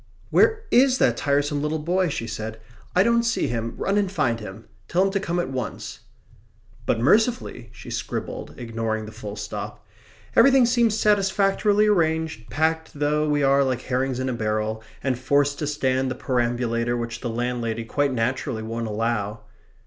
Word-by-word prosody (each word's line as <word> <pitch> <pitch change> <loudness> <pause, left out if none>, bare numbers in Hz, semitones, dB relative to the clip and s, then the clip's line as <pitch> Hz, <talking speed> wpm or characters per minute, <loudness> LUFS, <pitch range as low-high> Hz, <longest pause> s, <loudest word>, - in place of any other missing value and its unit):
"Where 445 -1 +4
IS 255 +1 +5
that 120 - +3
tiresome 145 +2 0
little 150 +1 -1
boy?" 175 +3 0
she 115 - -3
said. 110 0 -5 0.4
"I 185 - +6
don't 235 +1 +3
see 235 0 0
him. 115 -1 -3
Run 200 +1 +1
and 200 -3 0
find 120 -11 0
him. 105 +1 -9 0.2
Tell 180 +2 +2
him 195 - +1
to 200 - 0
come 175 -2 -2
at 175 - -2
once." 125 -4 -5 0.4
"... - - -30
but 115 - +2
mercifully," 210 - +1
she 120 0 -11
scribbled, 115 -2 -5
ignoring 115 -2 -3
the 110 - -9
full 105 -2 -7
stop, 105 -1 -6 0.5
"everything 265 +1 +6
seems 235 -3 +2
satisfactorily 205 +1 +3
arranged, 160 - 0
packed 160 +1 -1
though 150 +1 +1
we 145 -1 +2
are 140 0 +4
like 130 -2 -1
herrings 130 0 -1
in 130 - -1
a 130 - -1
barrel, 110 -1 -1 0.2
and 130 -3 0
forced 140 +2 +1
to 150 - -2
stand 130 -3 0
the 130 - -3
perambulator 120 -1 0
which 115 0 -4
the 120 - -3
landlady 115 -1 -2
quite 145 +4 0
naturally 125 0 -1
won't 115 +1 -3
allow...." 105 -1 -2
130 Hz, 170 wpm, -24 LUFS, 115-170 Hz, 0.5 s, I